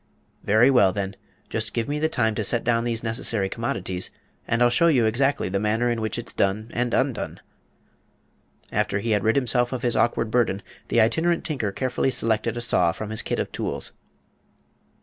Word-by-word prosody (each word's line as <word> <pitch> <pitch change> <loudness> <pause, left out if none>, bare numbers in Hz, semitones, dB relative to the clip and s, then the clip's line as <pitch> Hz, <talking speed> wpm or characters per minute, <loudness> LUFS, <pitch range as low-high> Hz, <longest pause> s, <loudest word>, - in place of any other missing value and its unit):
"Very 110 +6 +5
well, 100 -8 +5
then. 100 0 -4 0.3
Just 110 0 -3
give 115 -1 -1
me 150 +1 -2
time 110 -8 +1
to 105 - -2
set 115 +3 +1
down 115 0 +1
these 115 -1 -1
necessary 110 -3 0
commodities, 95 -5 -1 0.4
and 115 +1 +2
I'll 120 - +4
show 170 +8 +4
you 130 -8 +4
exactly 135 +6 +1
the 95 +1 -1
manner 110 +3 +1
in 115 -1 -2
which 110 0 -2
it's 120 - -5
done 105 +4 -1
and 120 0 0
undone." 130 -3 -1 1.3
After 105 -1 0
he 115 +3 -2
had 105 -1 +2
rid 110 - +2
himself 125 -2 +1
of 130 -1 -4
his 120 -2 +1
awkward 115 -1 +1
burden, 110 -5 +1 0.2
the - - +2
Itinerant 160 +10 +2
Tinker 130 -11 -2
carefully 130 +4 -1
selected 115 -2 0
a - - -2
saw 90 -8 +2
from 110 +5 -6
his 110 - -1
kit - - -2
of - - -3
tools. - - -4
115 Hz, 190 wpm, -24 LUFS, 105-120 Hz, 1.3 s, Very